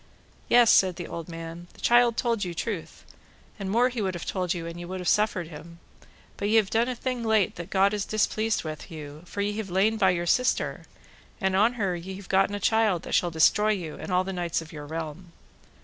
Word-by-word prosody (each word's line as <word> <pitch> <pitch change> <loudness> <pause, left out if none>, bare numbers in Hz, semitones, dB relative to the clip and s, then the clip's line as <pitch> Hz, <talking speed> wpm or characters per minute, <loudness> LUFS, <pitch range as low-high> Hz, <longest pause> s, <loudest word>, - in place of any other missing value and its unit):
Yes, 240 -2 +6
said 185 -2 +4
the 175 - -6
old 170 0 -7
man, 165 +1 -8
the - - -17
child 240 -1 +4
told 230 -4 0
you 175 -2 -4
truth, 190 -2 -5 0.5
and 195 -1 -4
more 230 +5 +3
would 250 0 +2
he 235 - -2
have 185 -3 -3
told 180 -3 -2
you 170 -2 -2
an 170 +1 -7
ye - - -6
would 185 +1 -5
have 180 - -5
suffered 200 -6 +1
him. 170 +2 -11 0.6
But 205 - -1
ye 220 - +3
have 215 -3 +3
done 230 +2 +2
a 250 - -2
thing 250 0 -3
late 220 -4 +2
that 170 +1 -7
God 195 +1 +3
is 205 -1 -1
displeased 215 +1 0
with 155 +1 -7
you, 150 -2 -9
for 200 - -4
ye 205 +1 -1
have 215 -3 -4
lain 200 +5 +2
by 190 -3 +4
your 175 -1 0
sister, 250 +8 +1 0.5
and 190 -1 +1
on 215 +5 +4
her 195 -7 -1
ye 185 +3 -7
have 195 -1 -11
gotten 195 +1 +2
a - - -3
child 215 -4 +2
that - - -6
shall 175 - +3
destroy 210 +6 +3
you 170 -6 -5
and - - -7
all 180 0 +3
the 190 +1 -5
knights 175 -2 -1
of 165 +1 -10
your 150 -1 -8
realm. 165 +2 -6
190 Hz, 235 wpm, -26 LUFS, 170-215 Hz, 0.6 s, Yes